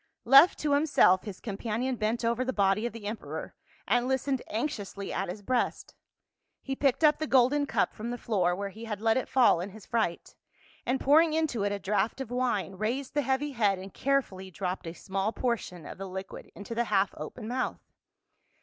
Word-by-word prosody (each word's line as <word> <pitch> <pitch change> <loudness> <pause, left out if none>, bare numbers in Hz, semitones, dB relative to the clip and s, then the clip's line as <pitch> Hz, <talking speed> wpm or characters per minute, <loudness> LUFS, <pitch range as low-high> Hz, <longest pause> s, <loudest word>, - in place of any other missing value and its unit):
Left 275 +8 +8
to 295 -1 0
himself 285 - +4
his 200 -4 -7
companion 230 +4 -2
bent 230 +1 -1
over 235 +2 +1
the 260 - -1
body 200 +1 +2
of - - -6
the 230 -3 -10
emperor 215 +2 -5 0.3
and 245 0 +2
listened 265 0 0
anxiously 205 -4 -4
at - - -2
his 205 +3 -7
breast; 255 +3 -1 0.7
he 270 - -3
picked 275 +2 +1
up 300 -1 +5
the 310 - -2
golden 275 +3 +3
cup - - +1
from 225 +2 -6
the 245 - -3
floor 185 -7 +1
where 200 +1 -4
he 220 +4 -9
had 210 -3 -4
let 225 +1 +2
it 260 - -1
fall 250 -9 +5
in 185 - -5
his 210 0 -13
fright, 220 -8 -2 0.5
and 260 +2 +1
pouring 310 +3 +5
into 310 -9 0
it 205 - 0
a 205 - -1
draught 210 +5 -1
of 265 -3 -5
wine 240 -7 -1
raised 250 +5 -2
the 290 - +2
heavy 270 +2 0
head 210 -6 +2
and 190 +1 -9
carefully 250 -9 -1
dropped 185 -1 -4
a 165 - -5
small 195 +4 -2
portion 230 -9 -3
of - - -9
the 195 -1 -5
liquid 190 +1 -8
into 205 +3 -7
the 235 +1 0
half 200 -2 +1
open 215 +9 -7
mouth. 255 +2 -3
230 Hz, 200 wpm, -29 LUFS, 200-265 Hz, 0.7 s, Left